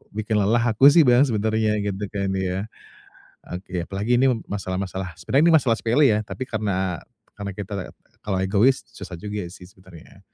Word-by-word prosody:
bikin 110 0 0
lelah 110 +4 +2
aku 135 +6 +7
sih 165 +1 +6
Bang 125 +3 +6
sebenarnya 110 -1 0
gitu 100 0 -3
kan 100 -2 -2
ya. 95 +2 -2 0.9
Oke 90 -1 -5
apalagi 105 +5 0
ini 135 -1 +4 0.2
masalah-masalah 95 -2 -4
sebenernya 135 - +2
ini 165 - +4
masalah 120 -6 +2
sepele 130 +5 +3
ya 105 0 +2
tapi 130 - -6
karena 95 -5 -2 0.4
karena 100 -1 -5
kita 100 0 -7
la 95 - -4 0.4
kalau 95 -3 -1
egois 110 +8 +3
susah 90 -4 -9
juga 105 -1 -4
sih 90 - -13
sebenarnya. 95 -1 -17
105 Hz, 170 wpm, -23 LUFS, 95-110 Hz, 0.9 s, aku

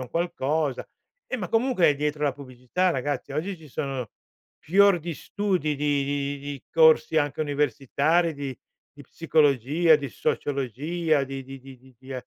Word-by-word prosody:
un 125 - -7
qualcosa. 155 -4 -1 0.4
Eh, 255 - -3
ma 180 -5 -4
comunque, 225 - +3
dietro 150 +1 -1
la 140 - +2
pubblicità, 130 +6 -2
ragazzi, 145 -1 -3
oggi 180 +6 -3
ci 155 -2 -15
sono 130 -4 -4 0.5
fior 195 +2 +4
di 165 0 -5
studi, 180 -8 -1
di 145 -1 0
di 140 0 -2
di 140 -2 -7
corsi 160 -1 +5
anche 145 +1 -1
universitari, 150 +3 +1
di 140 -3 -6 0.3
di 145 - -13
psicologia, 150 +1 +3
di 140 -2 -5
sociologia, 145 +3 -1
di 135 0 -6
di 135 +1 -9
di 135 -1 -13
di 130 -1 -21
di 130 +1 -10
e 125 - -6
145 Hz, 155 wpm, -25 LUFS, 135-165 Hz, 0.5 s, corsi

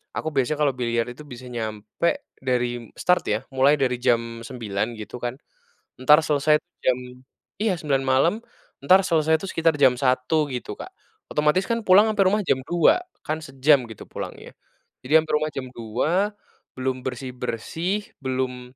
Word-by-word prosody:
Aku, 160 - -2
biasanya 140 +3 +1
kalau 145 -2 +3
biliar 115 -2 0
itu, 125 +5 -10
bisa 130 -3 -10
nyampe, 110 - -2 0.2
dari 120 -3 -1
start 180 0 +3
ya, 105 - +1 0.2
mulai 135 +2 +5
dari 125 -2 +1
jam 115 -1 0
9.00 115 -3 -3
gitu 105 - -7
kan, 120 +1 -3 0.7
entar, 150 +4 +7
selesai 150 0 +3 0.3
jam 125 -1 +3 0.6
iya 210 -4 +1
9.00 140 -3 +1
malam, 130 +7 +3 0.5
entar 185 +1 +6
selesai 160 -3 +3
tuh, 195 - -5
sekitar 165 -1 +2
jam 130 -3 +6
1.00 130 +4 +1
gitu, 125 - -5
Kak. 375 - -9 0.4
Otomatis 150 +5 +2
kan, 230 +2 -1
pulang, 195 +4 +7
ampe 210 - -1
rumah 210 +3 +2
jam 130 -6 +1
2.00 175 - +3 0.3
kan, 155 +1 -2
sejam 135 -2 +3
gitu, 110 - -9
pulangnya. - - -8 0.5
Jadi, 130 - -6
ampe 155 - -10
rumah 155 +1 0
jam 135 - -4
2, 155 - 0 0.4
belum 130 0 -2
bersih-bersih, 130 - -4
belum, 130 -1 -3
130 Hz, 155 wpm, -24 LUFS, 125-160 Hz, 0.7 s, entar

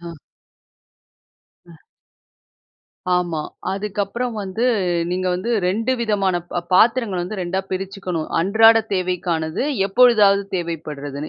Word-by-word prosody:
அ. 170 -1 -8 1.5
அ. 170 - -14 1.4
ஆமா. 175 -3 0 0.3
அதுக்கப்புறம் 210 +4 -3
வந்து 195 +5 -3 0.5
நீங்க 185 +1 -2
வந்து 185 +6 -3 0.2
2 225 +7 0
விதமான 200 -5 +1
ப 175 - -2
பாத்திரங்கள் 220 -3 +3
வந்து 195 +3 -5
2 180 +2 -2
பிரிச்சுக்கணும். 185 -3 -4
அன்றாட 225 +5 +5
தேவைக்கானது, 180 -2 -1 0.2
எப்பொழுதாவது 205 -3 +5
தேவைப்படுறதுன்னு. 150 -4 -5
190 Hz, 95 wpm, -20 LUFS, 175-210 Hz, 1.5 s, அன்றாட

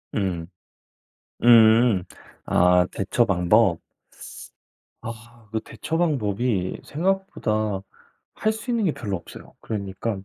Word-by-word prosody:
음. 90 -5 -2 1.0
음. 115 -4 +6 0.4
아 90 0 +4
대처 105 +5 +1
방법, 95 -1 +3 1.2
아 115 +1 -10
그 110 0 -2
대처 160 - -5
방법이 110 - -1
생각보다 145 - -1 0.5
할 215 - 0
수 220 +3 -6
있는 230 -2 0
게 160 - +2
별로 100 -5 -4
없어요. 85 - -12
그러니깐 100 -1 -4
110 Hz, 190 characters per minute, -23 LUFS, 95-120 Hz, 1.2 s, 음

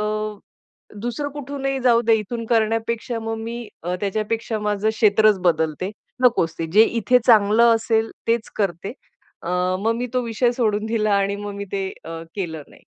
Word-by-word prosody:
अ, - - 0 1.0
दुसरं 245 +5 -3
कुठूनही 275 -1 -3
जाऊदे 235 -2 +4
इथून 230 +2 -5
करण्यापेक्षा 225 +1 0
मग 225 0 -3
मी 230 0 -6 0.2
अ, 180 +1 -1
त्याच्यापेक्षा 215 +2 -2
माझं 210 0 0
क्षेत्रच 215 -2 +4
बदलते. 165 +2 0 0.3
नकोच 170 -10 +3
ते. 165 - -2
जे 215 - +8
इथे 235 +2 +2
चांगलं 225 +1 +6
असेल 225 0 0 0.2
तेच 230 -1 0
करते. 195 +1 -2 0.5
अ, - - -3 0.3
मग 225 +2 +1
मी 245 - -2
तो 255 - +1
विषय 235 +2 +1
सोडून 220 -3 0
दिला 215 -2 +1
आणि 200 0 +1
मग 205 0 -6
मी 200 0 -5
ते 195 -1 -1 0.2
अ, 165 0 -6
केलं 160 -6 -4
नाही. - - -19
220 Hz, 160 wpm, -22 LUFS, 200-235 Hz, 1.0 s, जे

